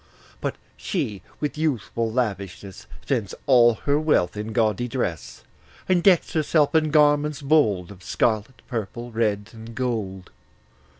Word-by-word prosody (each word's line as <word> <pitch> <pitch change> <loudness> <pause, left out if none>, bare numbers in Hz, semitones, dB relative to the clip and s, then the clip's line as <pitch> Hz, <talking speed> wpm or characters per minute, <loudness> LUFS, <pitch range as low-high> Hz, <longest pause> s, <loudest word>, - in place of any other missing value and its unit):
But - - -2 0.2
she, 130 - -3 0.2
with 150 0 -3
youthful 115 -6 -1
lavishness, 100 - -4 0.2
Spends 115 -8 -2
all 120 -3 +6
her 145 +1 +3
wealth 150 - +2
in 105 +1 -5
gaudy 110 +1 +1
dress, 110 - -4 0.4
And 185 -2 +3
decks 180 -2 +4
herself 155 -1 +2
in 155 -1 +3
garments 145 -1 +3
bold 110 - +2
Of 100 -2 -13
scarlet, 110 +6 -1
purple, 120 +1 -5
red, 105 -3 -1
and 115 0 -10
gold. 105 -8 -3
120 Hz, 130 wpm, -24 LUFS, 105-145 Hz, 0.4 s, all